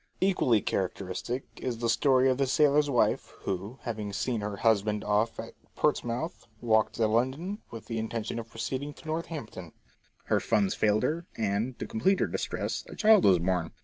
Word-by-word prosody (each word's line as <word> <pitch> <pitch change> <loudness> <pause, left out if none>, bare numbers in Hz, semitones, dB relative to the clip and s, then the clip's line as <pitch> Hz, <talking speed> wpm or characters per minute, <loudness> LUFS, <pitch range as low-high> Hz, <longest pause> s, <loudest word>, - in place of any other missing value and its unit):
Equally 155 - +3
characteristic 95 +6 -2
is 125 -3 -3
the 115 0 -1
story 130 +2 +4
of 130 0 +2
the 135 - +2
sailor's 145 +2 +3
wife 125 -4 +1
who, 100 +6 -4
having 110 -4 -4
seen 110 +2 -1
her 105 -1 -4
husband 105 -1 +2
off 105 +2 +1
at - - -7 0.2
Portsmouth, 120 +8 -1
walked 110 -2 +2
to 115 - +2
London, 130 - 0
with 115 -2 -9
the 115 -1 -3
intention 110 +1 -3
of 115 0 -8
proceeding 130 +6 -4
to - - -16
Northampton. 155 - -5 0.5
Her - - +1
funds 105 -4 +1
failed 105 +1 +2
her, 165 +6 -1
and, 110 +3 -1
to - - -4
complete 205 -4 +1
her - - +3
distress, - - -3
a - - -8
child 215 -3 +5
was 95 -2 +6
born. 85 -1 -1
115 Hz, 175 wpm, -29 LUFS, 105-140 Hz, 0.5 s, was